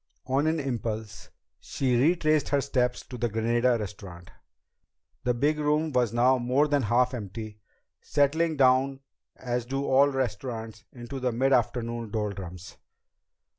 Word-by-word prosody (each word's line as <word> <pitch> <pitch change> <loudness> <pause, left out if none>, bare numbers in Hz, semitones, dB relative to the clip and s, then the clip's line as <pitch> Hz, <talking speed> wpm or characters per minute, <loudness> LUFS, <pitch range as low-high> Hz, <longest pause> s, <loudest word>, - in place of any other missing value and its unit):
On 135 +4 +1
an 160 0 +1
impulse, 110 -5 -4 0.3
she 130 -3 -1
retraced 155 +3 +2
her 145 - +2
steps 125 -3 0
to 125 - -9
the 120 - 0
Granada 120 +3 +1
Restaurant. 95 -4 -8 0.9
The 125 -1 +2
big 150 +5 +1
room 150 +1 +1
was 125 -4 +1
now 125 +2 +3
more 130 +5 +2
than 145 -1 +1
half 125 +3 +2
empty, 110 -1 -7 0.4
settling 155 +3 +1
down 135 +1 +3 0.3
as 125 -1 -3
do 135 +2 -2
all 135 +1 +5
restaurants 115 -4 -4
into 125 +2 -7
the 125 -1 0
mid 135 +4 +1
afternoon 120 -2 0
doldrums. 95 -4 -5
125 Hz, 135 wpm, -27 LUFS, 115-140 Hz, 0.9 s, all